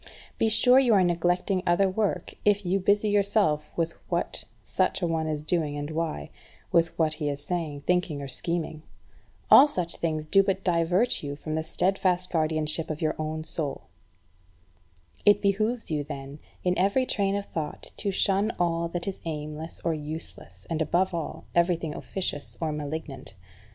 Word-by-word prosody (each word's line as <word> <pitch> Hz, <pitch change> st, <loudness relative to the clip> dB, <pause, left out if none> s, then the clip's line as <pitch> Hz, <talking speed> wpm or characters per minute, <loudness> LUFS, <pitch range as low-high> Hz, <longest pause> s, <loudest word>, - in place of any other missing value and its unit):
Be 225 Hz, -, +3 dB
sure 250 Hz, +4 st, +6 dB
you 245 Hz, -5 st, +4 dB
are 190 Hz, -, +5 dB
neglecting 175 Hz, +2 st, +1 dB
other 175 Hz, +3 st, +4 dB
work 190 Hz, -2 st, -1 dB
if 205 Hz, -1 st, +3 dB
you 185 Hz, +2 st, +1 dB
busy 205 Hz, +3 st, +3 dB
yourself 200 Hz, -7 st, +2 dB
with 165 Hz, 0 st, 0 dB, 0.2 s
what -, -, -1 dB, 0.2 s
such -, -, 0 dB
a -, -, +2 dB
one 160 Hz, -1 st, -1 dB
is 150 Hz, -1 st, -2 dB
doing 155 Hz, -2 st, 0 dB
and 145 Hz, +1 st, -4 dB
why, 155 Hz, -, -3 dB, 0.4 s
with 165 Hz, 0 st, +2 dB
what 160 Hz, -2 st, +2 dB
he 150 Hz, -2 st, -2 dB
is 145 Hz, 0 st, -4 dB
saying, 160 Hz, -5 st, -3 dB
thinking, 180 Hz, -2 st, 0 dB
or 140 Hz, -, -5 dB
scheming. 165 Hz, +2 st, -1 dB, 0.7 s
All 280 Hz, -, +10 dB
such 180 Hz, -, -2 dB
things 155 Hz, -2 st, -1 dB
do 195 Hz, +4 st, +6 dB
but 195 Hz, -1 st, -1 dB
divert 180 Hz, +5 st, +2 dB
you 145 Hz, -1 st, -4 dB
from 155 Hz, +2 st, -5 dB
the 160 Hz, -, 0 dB
steadfast 180 Hz, +2 st, +1 dB
guardianship 155 Hz, 0 st, 0 dB
of 155 Hz, -1 st, -3 dB
your 155 Hz, -1 st, +1 dB
own 155 Hz, 0 st, -3 dB
soul. 150 Hz, -3 st, -4 dB, 1.3 s
It 205 Hz, -, +6 dB
behoves 215 Hz, +2 st, 0 dB
you, 150 Hz, -2 st, 0 dB
then, 140 Hz, 0 st, -7 dB, 0.2 s
in 180 Hz, 0 st, +2 dB
every 200 Hz, +8 st, +3 dB
train 200 Hz, -4 st, 0 dB
of 200 Hz, 0 st, -2 dB
thought 155 Hz, -5 st, -5 dB
to 205 Hz, -, -2 dB
shun 200 Hz, +2 st, +2 dB
all 170 Hz, -1 st, +1 dB
that 170 Hz, +1 st, -3 dB
is 195 Hz, -, -4 dB
aimless 155 Hz, 0 st, -5 dB
or 165 Hz, -, 0 dB
useless, 155 Hz, +1 st, -7 dB
and, 165 Hz, -1 st, -2 dB
above 175 Hz, +4 st, +1 dB
all, 165 Hz, -3 st, -4 dB
everything 170 Hz, -2 st, +1 dB
officious 160 Hz, -6 st, -5 dB
or 160 Hz, -2 st, -1 dB
malignant. 145 Hz, -4 st, -5 dB
170 Hz, 170 wpm, -27 LUFS, 155-190 Hz, 1.3 s, All